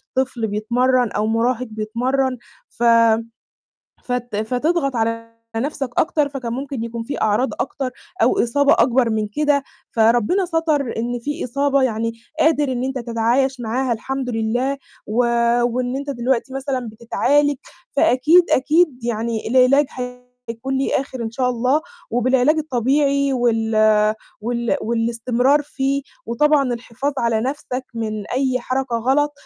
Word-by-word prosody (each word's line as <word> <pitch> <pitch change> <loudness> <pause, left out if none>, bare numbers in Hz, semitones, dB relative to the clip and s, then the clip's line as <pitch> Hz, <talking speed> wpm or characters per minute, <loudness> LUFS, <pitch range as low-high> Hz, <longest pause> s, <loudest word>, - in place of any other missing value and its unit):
طفل 255 -4 0
بيتمرّن 240 +3 +1
أو 210 +1 -1
مراهق 235 +2 0
بيتمرّن، 250 +5 -1 0.3
ف 240 - -6 1.2
فت 245 -3 -3
فتضغط 270 +5 0
على 230 0 -2 0.2
نفْسك 270 +1 -2
أكتر، 300 -2 +2
فكان 255 -4 -5
ممكن 270 -2 -4
يكون 230 0 -5
في 280 +5 -5
أعراض 215 +5 +2
أكتر 265 -1 -2 0.3
أو 395 - +3
إصابة 280 +4 +3
أكبر 240 0 +3
من 215 -1 -1
كده، 290 +4 +1 0.3
فربنا 235 - +3
سَتَر 315 -6 0
إن 240 +2 -2
في 290 +6 -4
إصابة 275 +2 +1
يعني 230 -2 0 0.3
قادر 295 -4 +3
إن 250 +1 -2
أنت 265 0 -2
تتعايش 240 +3 0
معاها 240 +2 -1
الحمد 260 +3 -3
لله، 245 +5 -1 0.3
و 215 - -5 0.5
وإن 245 +2 -1
أنت 280 +1 -4
دلوقتي 260 +1 -1
مثلًا 265 -3 -3
بتتعالج، 280 +6 +1 0.4
فأكيد، 315 +8 +4
أكيد 290 -2 +2
يعني 225 -1 -2
العلاج 260 +4 +4 0.6
هيكون 265 +4 -3
ليه 270 - 0
آخر 260 -3 -6
إن 225 - -3
شاء 250 +2 0
الله، 250 +5 +1 0.3
وبالعلاج 255 +5 +3
الطبيعي 280 0 +1
وال 225 -3 +1 0.7
وال 235 +1 -1
والاستمرار 235 +5 +1
فيه، 275 0 -2 0.2
وطبعًا 275 +2 +2
الحفاظ 240 +4 -4
على 230 -2 +1
نفْسك 260 0 -3
من 215 -2 -4
أي 255 0 0
حركة 255 -1 -2
غلط 275 +5 +1
255 Hz, 130 wpm, -20 LUFS, 230-275 Hz, 1.2 s, فأكيد